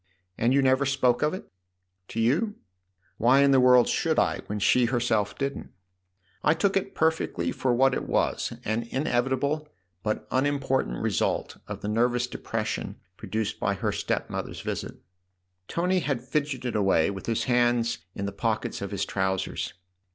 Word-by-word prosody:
"And 115 +5 +1
you 135 +1 +4
never 130 +1 +4
spoke 130 -3 +2
of 150 - +2
it? - - -9 0.2
" 90 0 -52
" 90 0 -51
To 115 - -5
you? 155 - +1 0.6
Why 130 +4 +5
in 140 - +5
the 135 - +6
world 125 -1 +6
should - - +1
I - - +2
when 105 - -3
she 120 +4 +4
herself 115 -4 0
didn't? 140 0 -3 0.7
I 150 - +4
took 195 +3 +1
it 195 0 -1
perfectly 160 - 0
for 130 - 0
what 135 +2 +4
it - - -3
was - - 0
an 115 +2 -1
inevitable 135 +3 0 0.3
but 105 +2 -2
unimportant 135 - 0
result - - 0
of - - -6
the - - -4
nervous 120 +3 +2
depression 125 - -4 0.2
produced 110 +1 -3
by 100 - 0
her 90 - -1
step - - -2
mother's - - -5
visit." - - -4 0.7
Tony 180 +2 +1
had 140 -7 -2
fidgeted 135 -4 -2
away 95 -4 +3
with 95 -1 -8
his 115 -1 0
hands 120 -2 +2 0.2
in 100 - -3
the 100 - -2
pockets 110 +2 -2
of 100 - -3
his 100 -1 -2
trousers. 95 -1 -2
120 Hz, 165 wpm, -27 LUFS, 105-140 Hz, 0.7 s, the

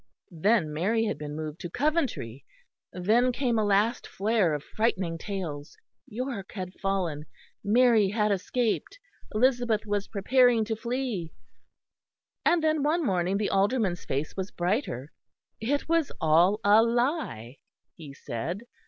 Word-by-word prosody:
Then 170 -2 +2
Mary 215 +9 +1
had 210 - -2
been 150 0 -6
moved 155 0 -6
to 175 - -6
Coventry; 260 - -1 0.5
then 225 +8 +2
came 245 -3 0
a - - +2
last 205 +4 +1
flare 200 -5 +1
of 145 - -5
frightening 185 -7 -1
tales: 165 -8 -6 0.3
York 240 -4 -5
had 185 -2 -5
fallen; 175 -6 -2 0.4
Mary 225 -2 +4
had 210 0 +1
escaped; 220 - -1 0.4
Elizabeth 240 -2 +2
was 205 -1 -2
preparing 235 +2 +3
to 225 +1 -2
flee. 235 -7 -3 1.1
And 340 -2 +3
then 310 -1 +2
one 310 +3 +1
morning 185 -1 +1
the 205 0 -1
Alderman's 195 -2 +1
face 140 +3 -3
was 190 0 -3
brighter: 175 - -2 0.5
it 280 +6 -1
was 330 -3 +1
all 170 +6 +4
a 205 +2 +6
lie, 235 - -1 0.4
he 155 -4 -10
said. 140 - -5
205 Hz, 135 wpm, -27 LUFS, 175-240 Hz, 1.1 s, a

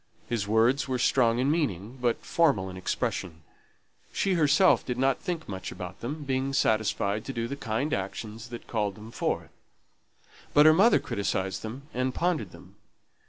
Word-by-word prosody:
His 110 -4 -2
words 115 +6 +3
were 130 -1 -1
strong 120 -2 +3
in 130 +3 +2
meaning, 125 - -2
but 120 -2 0
formal 115 - +2
in - - -9
expression; 90 -2 -3 0.7
she 195 - 0
herself 165 +3 +4
did 125 -1 -3
not 135 +1 +2
think 170 -3 -4
much 95 -2 -5
about 90 +1 -8
them, 145 +6 -5
being 135 0 -1
satisfied 110 -3 +1
to 135 - -4
do 115 -1 -2
the 140 - -4
kind 135 +3 -2
actions 110 +4 -4
that 120 -1 -8
called 105 -4 -1
them 110 +2 -11
forth. - - -2 1.0
But 150 +1 +7
her 155 - +8
mother 200 +8 +5
criticised 95 -2 -2
them 120 +5 -7
and 130 +1 -1
pondered 165 - 0
them. - - -15
120 Hz, 165 wpm, -28 LUFS, 105-140 Hz, 1.0 s, her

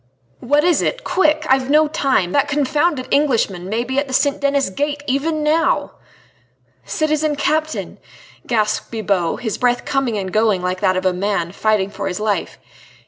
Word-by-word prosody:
"What 290 +4 +2
is 345 -3 +3
it? - - -2
Quick! 310 -4 +1
I've 265 0 +2
no 305 +1 +4
time. 270 - 0
That 285 +7 +2
confounded 295 0 0
Englishman 225 -11 +1
may 225 +3 -1
be 260 +2 -1
at 285 - -2
the 260 - -2
St. 280 +1 +1
Denis 280 -6 +1
Gate 290 +6 -2
even 300 +3 -1
now!" 315 +2 +1 0.9
"Citizen 310 -1 0
Captain," 310 +2 -2 0.5
gasped 215 -2 0
Bibot, 200 -5 -1
his 220 -4 -3
breath 245 -1 +1
coming 270 -5 -1
and 190 -2 -4
going 215 -4 +2
like 185 +1 -2
that 185 -2 +2
of 185 - -3
a 185 - +3
man 180 -2 -1
fighting 205 -1 0
for 200 -1 -4
his 180 0 -3
life. 210 -4 -2
255 Hz, 170 wpm, -19 LUFS, 200-295 Hz, 0.9 s, no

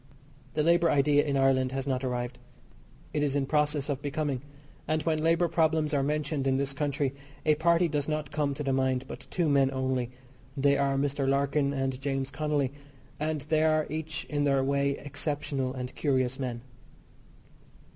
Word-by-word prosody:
The 150 - +2
labour 170 +1 +4
idea 145 0 +4
in 140 -2 0
Ireland 130 -1 +3
has 135 -1 -2
not 130 -1 -1
arrived. 125 -1 -3 0.7
It 150 - 0
is 145 -1 +1
in 140 -1 +1
process 150 0 +1
of 140 -2 -2
"becoming," 145 -3 -2 0.5
and 155 -1 0
when 155 -1 0
labour 165 +1 +3
problems 160 -2 +1
are 140 - +3
mentioned 145 -1 -1
in 130 0 +2
this 140 0 0
country 140 -2 -1 0.3
a 155 - +5
party 170 +3 +3
does 145 -3 -1
not 155 -2 -2
come 145 -2 0
to 150 - -4
the 135 -1 0
mind, 130 -1 +1
but - - -9
two 175 -3 0
men 140 -2 +4
only 130 -2 -1 0.5
they 140 +1 +4
are 140 -1 +1
Mr. 140 -1 0
Larkin 140 +1 +2
and 135 -1 -2
James 135 -1 -2
Connolly, 150 -3 0 0.5
and 155 0 -1
they 155 +2 +1
are 155 -1 +3
each 155 -1 -3
in 145 -1 -1
their 140 -2 +3
way 140 0 +1
exceptional 140 -2 -2
and 125 -1 -5
curious 130 -3 0
men. 120 -3 -3
140 Hz, 175 wpm, -29 LUFS, 135-150 Hz, 0.7 s, a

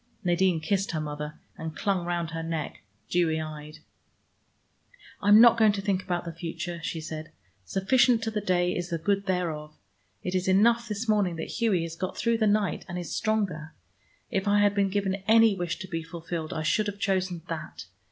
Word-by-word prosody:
Nadine 180 -1 +2
kissed 195 +4 -1
her 160 - -1
mother, 150 0 -5 0.2
and 160 -1 -6
clung 190 -4 0
round 170 -2 -2
her 165 0 -4
neck, 165 -1 -4 0.3
dewy 165 -3 +1
eyed. 155 0 -7 1.4
"I'm 205 +1 +7
not 235 0 +7
going 215 -2 +5
to 200 - -3
think 190 -2 +1
about 175 -1 -3
the 170 - -5
future," 170 +1 -5
she 165 0 -3
said. 155 0 -7 0.3
"Sufficient 235 - +3
to 225 - -1
the 210 -1 -2
day 180 -2 +1
is 175 0 -3
the 170 - -1
good 200 +4 0
thereof. 160 -5 -2 0.5
It 180 - -3
is 185 0 0
enough 230 +5 +4
this 210 +2 -4
morning 205 -5 +2
that 160 - -5
Hughie 210 -8 +2
has 165 0 -5
got 185 +2 -4
through 230 0 +1
the 215 - +3
night 205 -2 +1
and 175 - -4
is 175 -4 -5
stronger. 190 -8 -1 0.6
If 195 -2 -1
I 205 0 +4
had 205 -1 +4
been 200 -1 +2
given 195 -1 -1
any 225 -1 +6
wish 175 -2 -3
to 190 - -7
be 165 -3 -3
fulfilled 165 0 -5
I 160 -3 -3
should 210 +7 +1
have 205 -1 -4
chosen 185 -4 -1
that. 165 -1 -6
180 Hz, 195 wpm, -27 LUFS, 165-205 Hz, 1.4 s, I'm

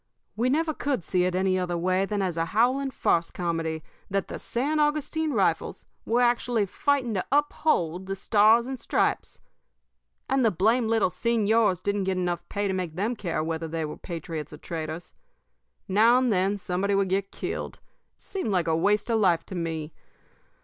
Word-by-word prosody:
We 240 +3 +1
never 315 +3 +1
could 280 - -2
see 180 +1 +1
it 180 0 0
any 185 0 +2
other 175 -1 -1
way 185 +3 +1
than 205 -1 -1
as 180 -3 -1
a 165 0 0
howling 250 +9 +2
farce 170 -9 +1
comedy 165 -2 -3 0.3
that 195 -1 -1
the - - -5
San 285 +6 -1
Augustine 305 +1 0
Rifles - - 0 0.2
were 240 +2 +2
actually 240 -2 +2
fighting 255 +4 0
to 185 - -1
uphold 190 - +1
the 195 - -2
Stars 215 +4 +4
and 260 0 -5
Stripes. - - -1 0.9
And 270 -1 +2
the 225 - +5
blamed 220 +5 +2
little 225 -5 +2
señors 215 -2 +2
didn't 200 -1 0
get 190 -1 0
enough 175 -1 -1
pay 205 0 -1
to 190 - -1
make 180 -4 -3
them 215 +7 -1
care 175 -7 -2
whether 165 0 -3
they 160 0 -3
were 150 - -6
patriots 165 -4 -6
or 150 - -9
traitors. 160 +1 -6 0.7
Now 220 +5 +5
and 255 -3 +2
then 195 +2 +1
somebody 195 +1 -1
would 195 -1 +1
get 195 +1 -1
killed. - - -4 0.4
It - - -26
seemed 380 - -3
like 180 -4 +1
a 160 - +2
waste 205 +5 +2
of 225 - +2
life 175 -5 +3
to - - -9
me. 165 -3 -4
195 Hz, 185 wpm, -26 LUFS, 175-235 Hz, 0.9 s, the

